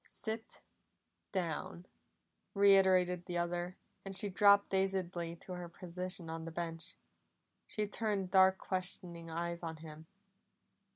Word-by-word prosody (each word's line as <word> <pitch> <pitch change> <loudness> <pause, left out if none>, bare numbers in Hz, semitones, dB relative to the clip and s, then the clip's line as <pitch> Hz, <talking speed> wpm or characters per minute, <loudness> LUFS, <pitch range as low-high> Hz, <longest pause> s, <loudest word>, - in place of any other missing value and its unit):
"Sit 220 0 -2 0.7
down!" 175 -1 -3 0.7
reiterated 190 -3 +5
the 175 - -2
other, 175 +1 -2 0.3
and 195 -1 -3
she 205 +1 +2
dropped 200 +1 +5
dazedly 185 -3 -1
to 175 - -11
her 175 -1 -6
position 180 0 -5
on 160 0 -5
the 165 - -6
bench. 165 0 -4 0.7
She 210 - -1
turned 205 -3 -2
dark 190 0 +6
questioning 180 -3 -2
eyes 170 +1 -3
on 165 -2 -5
him. 155 0 -11
180 Hz, 120 wpm, -35 LUFS, 170-195 Hz, 0.7 s, dark